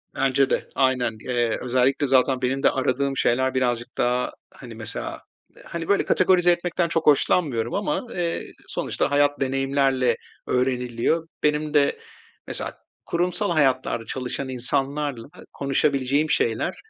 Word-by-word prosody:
Bence 135 0 +2
de. - - -1
Aynen. 125 -4 +1
Eee, 120 -2 0
özellikle 130 +3 +1
zaten 130 0 +3
benim 130 +2 -1
de - - +6
aradığım 135 +1 0
şeyler 130 +2 +2
birazcık 120 -1 -1
daha, 125 +1 +1 0.2
hani, - - -11
mesela, - - -6 0.4
hani, 165 -1 -5
böyle, 200 - +2
kategorize 180 -1 +4
etmekten 175 0 0
çok 165 0 -1
hoşlanmıyorum 135 -5 +2
ama 255 +5 -1
eee, 170 -1 -2 0.2
sonuçta - - -2
hayat 145 0 +3
deneyimlerle 135 -2 +1 0.3
öğreniliyor. 125 +5 0 0.2
Benim 150 0 +1
de 140 -1 +3 0.5
mesela - - -4 0.3
kurumsal 180 +3 0
hayatlarda 130 -6 +1
çalışan 130 +2 -4
insanlarla 135 +1 -1 0.3
konuşabileceğim 140 +1 +1
şeyler, 115 -6 0
135 Hz, 125 wpm, -24 LUFS, 125-150 Hz, 0.5 s, de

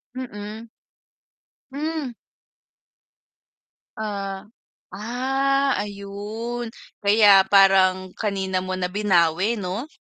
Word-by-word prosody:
Mm. 220 -2 -7 1.0
Hmm. 305 -1 -3 1.9
Ah, 200 -3 -4 0.5
ah, 270 +4 0
ayun 205 +4 -5 0.3
kaya 205 -2 +6
parang 190 -1 +4
kanina 190 -3 -1
mo 185 0 -4
na 180 -1 -2
binawi 190 0 +2
'no? 205 +5 -4
205 Hz, 70 wpm, -23 LUFS, 190-235 Hz, 1.9 s, kaya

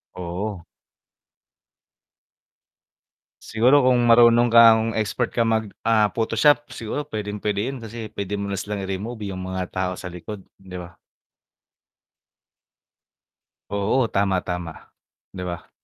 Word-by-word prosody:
Oo. 90 +2 -5 2.8
Siguro 125 +5 +3
kung 125 -1 +4
marunong 120 0 +6
kang 115 -1 +7 0.2
expert 110 +3 -1
kang 115 - 0
mag, 110 0 0 0.2
ah, 110 -2 +3
photoshop 120 +8 +2
siguro 125 +6 -4
pwedeng-pwede 105 -1 -3
yun 135 - -6
kasi 115 -1 -8
pwede 100 0 -4
mo 100 0 -3
na 100 - -3
silang 105 0 -4
i-remove 100 +3 -5
yung 95 -1 -6
mga 95 -1 -4
tao 95 0 -2
sa 90 0 -7
likod, 95 +4 -8 0.2
'di 95 -1 -10
ba? 85 -1 -12 2.8
Oo 105 +5 +1
tama, 100 -1 +2
tama, 90 -2 -4 0.6
'di 90 - -6
ba? 85 -1 -8
105 Hz, 115 wpm, -23 LUFS, 95-115 Hz, 2.8 s, kang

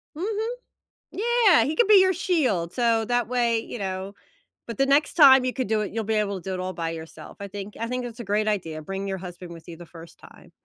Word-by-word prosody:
Mhm. 425 +6 -3 0.6
Yeah, 455 -4 +3
he 305 - -2
could 475 - +3
be 415 - +8
your 375 0 +4
shield, 260 - 0
so 230 -2 +1
that 245 +1 0
way, 235 -2 +1
you 230 - -8
know? 190 0 -4 0.5
But 230 -3 -7
the 275 - +3
next 285 +3 +2
time 270 -5 +7
you 255 - -1
could 260 - -3
do 220 0 +1
it, 205 - -5
you'll 225 +1 -2
be 220 +2 -1
able 200 -3 -1
to 190 - -7
do - - -2
it - - -4
all 185 0 -4
by 165 -2 -4
yourself, 160 0 -10
I 200 - -5
think 200 +1 -8
I 230 - -3
think 250 +1 -3
it's 240 -1 -8
a - - -5
great 210 +2 0
idea, 165 -7 -3
bring 195 +4 -5
your 190 -1 -3
husband 175 -1 -9
with 165 -1 -13
you 170 - -8
the 175 +1 -12
1st 165 0 -14
time. - - -17
220 Hz, 255 wpm, -24 LUFS, 185-265 Hz, 0.6 s, be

